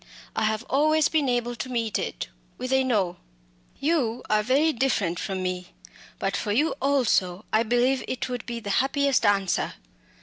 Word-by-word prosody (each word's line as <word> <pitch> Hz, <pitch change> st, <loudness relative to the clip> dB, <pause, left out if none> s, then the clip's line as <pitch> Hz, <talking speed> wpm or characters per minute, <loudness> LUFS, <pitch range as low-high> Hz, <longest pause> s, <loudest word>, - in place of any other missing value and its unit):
I -, -, +1 dB
have 215 Hz, +1 st, 0 dB
always 305 Hz, +3 st, +3 dB
been 300 Hz, -4 st, +1 dB
able 240 Hz, 0 st, 0 dB
to 235 Hz, +3 st, -5 dB
meet 230 Hz, -4 st, -1 dB
it -, -, -4 dB, 0.3 s
with 255 Hz, +1 st, -3 dB
a 265 Hz, 0 st, +4 dB
No! 200 Hz, -9 st, 0 dB, 0.6 s
You 275 Hz, -6 st, 0 dB
are 215 Hz, 0 st, +4 dB
very 280 Hz, +8 st, +3 dB
different 220 Hz, -9 st, 0 dB
from 190 Hz, -1 st, -3 dB
me 180 Hz, -1 st, -4 dB, 0.4 s
but 195 Hz, -, -1 dB
for 205 Hz, -, -2 dB
you 290 Hz, +10 st, +2 dB
also 220 Hz, -9 st, +1 dB
I 220 Hz, -, +5 dB
believe 245 Hz, +3 st, +2 dB
it 255 Hz, -, -2 dB
would 250 Hz, -1 st, -5 dB
be 235 Hz, -1 st, -3 dB
the 205 Hz, -3 st, -4 dB
happiest 280 Hz, -1 st, +2 dB
answer." 195 Hz, -2 st, +1 dB
240 Hz, 170 wpm, -26 LUFS, 205-270 Hz, 0.6 s, I